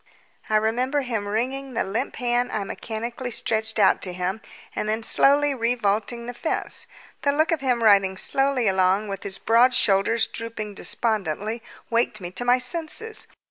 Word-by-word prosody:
I 215 - +1
remember 245 +6 +1
him 225 -6 -3
wringing 255 +5 -3
the - - +1
limp 195 +4 -3
hand 245 0 0
I 210 - -2
mechanically 235 +5 -5
stretched 220 -1 -1
out 210 - +4
to 180 - -1
him 185 +4 -3 0.3
and 210 - -2
then 220 +1 -1
slowly 285 +4 +5
revaulting 235 -1 -1
the 245 - -6
fence. 315 +7 -2 0.3
The 285 - +2
look 310 +4 +1
of 320 -4 0
him 250 -3 0
riding 195 -3 +4
slowly 270 +1 +2
along 190 +2 +2
with 195 -1 -5
his 195 -1 -3
broad 240 +3 +3
shoulders 220 +3 +3
drooping 220 -2 -6
despondently 215 0 -1 0.3
waked 230 -1 +1
me 175 -2 -7
to 245 - -2
my 245 +1 +4
senses. 335 - -2
230 Hz, 165 wpm, -24 LUFS, 205-250 Hz, 0.3 s, slowly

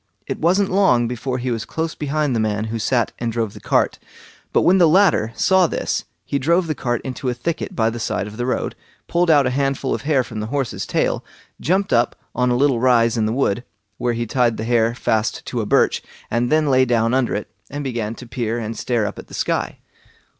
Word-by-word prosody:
It - - -4
wasn't 190 +4 +2
long 155 -12 +3
before 125 +2 -3
he 125 0 -2
was 115 -1 -2
close 160 +5 -3
behind 150 -2 -1
the - - +1
man 105 -1 0
who 115 - -2
sat 120 +1 +1
and 120 -1 -1
drove 115 -3 -2
the - - -10
cart; - - +1 0.5
but - - +3
when 190 +2 +5
the 170 -3 +6
latter 165 - +4
saw 185 +8 +4
this - - -2 0.2
he 140 - -1
drove 170 +6 +2
the 160 - -1
cart 120 -4 -2
into 130 0 -3
a 125 - -2
thicket 155 +7 -3
by 115 -1 +2
the 120 - -6
side 100 -3 -2
of 105 +1 -9
the 120 +2 -3
road, 130 - -1 0.3
pulled 175 0 +1
out 145 -3 +5
a 125 - +1
handful 135 0 0
of - - -3
hair 145 -3 +2
from 110 -2 -7
the 105 - -3
horse's 135 -1 -2
tail, - - 0 0.4
jumped 190 +4 +1
up 120 0 +2 0.2
on 125 0 +1
a 120 - +2
little 135 -2 +3
rise 120 -2 +4
in 110 -2 +1
the - - 0
wood, 120 -2 0 0.4
where 120 -1 0
he 120 0 -2
tied 120 0 +1
the - - -3
hair 115 0 +2
fast 110 -2 -1
to - - -2
a - - -4
birch, - - +3 0.3
and 120 +3 0
then 155 0 +3
lay 130 0 +5
down 115 -2 +2
under 130 -4 +1
it, 105 - -5 0.2
and 145 +1 -5
began 115 -4 -3
to 125 - -10
peer 115 -2 -2
and 115 -1 -4
stare 120 -4 0
up - - -5
at - - -10
the - - -9
sky. - - -1
125 Hz, 230 wpm, -21 LUFS, 115-145 Hz, 0.5 s, the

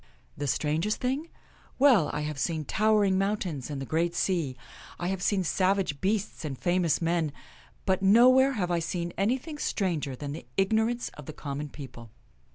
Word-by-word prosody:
" - - -35
The 145 - -3
strangest 160 +9 0
thing? 270 +6 -2 0.5
Well, 250 - +5
I 150 - -3
have 150 -2 -4
seen 155 0 -1
tower 215 +5 +3
ing 190 -1 +2
mountains 190 -9 -2
and 145 -2 -4
the 135 - -4
great 170 +4 0
sea; 160 -9 0 0.4
I 175 - -2
have 190 -1 -2
seen 195 0 +1
savage 185 -4 +1
beasts 205 -1 -1
and 140 -4 -4
famous 175 -1 +1
men; 165 -2 +1 0.5
but 190 -1 +1
nowhere 255 +7 +6
have 180 -7 -1
I 170 - +2
seen 170 +1 -3
anything 260 - -1
stranger 165 - -1
than 140 +2 -6
the 145 -5 -8
ignorance 220 +5 +1
of - - -12
the 155 - -6
com 140 -1 -5
mon 150 0 -5
people. 125 -5 -10
180 Hz, 180 wpm, -28 LUFS, 150-210 Hz, 0.5 s, nowhere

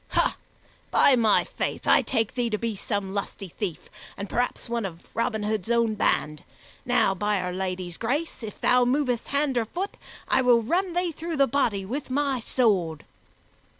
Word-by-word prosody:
Ha! - - +1 0.5
By 275 - +5
my 225 -4 +4
faith, - - -4
I - - +6
take 225 -4 -1
thee 245 -2 0
to 215 - 0
be 230 0 -2
some 200 -1 -3
lusty 200 -1 -4
thief, 180 -1 -5 0.3
and 200 - -5
perhaps 245 +4 -1
one 235 -1 -2
of 175 -4 -7
Robin 220 -2 -1
Hood's 215 -1 -2
own 235 -2 +2
band! 150 -7 0 0.4
Now, 195 - +3
by 205 +2 0
Our 180 0 -3
Lady's 185 -2 -3
grace, 285 +9 -2
if 220 -2 -7
thou 250 0 +4
movest 250 -2 0
hand 280 -3 +1
or 225 - -1
foot, 370 - -4 0.3
I - - +3
will 240 -2 +4
run 355 - 0
thee 355 -1 +1
through 330 +1 -5
the 275 - +5
body 230 -7 0
with 260 +8 -4
my 275 -1 0
sword!" 195 - +1
230 Hz, 180 wpm, -26 LUFS, 200-260 Hz, 0.5 s, I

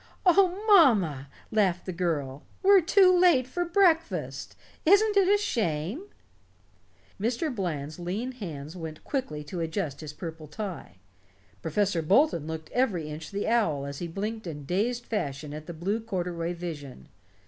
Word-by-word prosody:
"Oh, 375 +2 +4
mamma," 210 - +5 0.2
laughed 190 -5 +1
the 185 - -3
girl, 150 -6 -2 0.2
"we're 390 0 +7
too 365 +2 +5
late 350 -8 +5
for 350 +8 -2
breakfast! 340 -2 +1 0.3
Isn't 410 +5 +5
it 395 -2 +5
a 410 - +5
shame?" 220 - -2 1.2
Mr. 245 +7 -1
Bland's 155 - -4
lean 200 +9 -3
hands 160 - -7
went 160 -3 -7
quickly 155 - -3
to 160 +4 -6
adjust 160 -3 -3
his 155 -2 -6
purple 160 0 -8
tie. 195 +3 -6 0.7
Professor 180 +1 0
Bolton 190 - +3
looked 160 -1 -6
every 190 -12 0
inch 150 +1 -7
the 200 0 -3
owl 185 -12 +1
as 140 0 -6
he 175 - -4
blinked 210 +4 -4
in 145 -3 -6
dazed 235 - -1
fashion 145 -8 -3
at 155 +1 -8
the - - -5
blue 190 +7 -1
corduroy 175 -5 -3
vision. 145 - -7
185 Hz, 150 wpm, -27 LUFS, 155-255 Hz, 1.2 s, we're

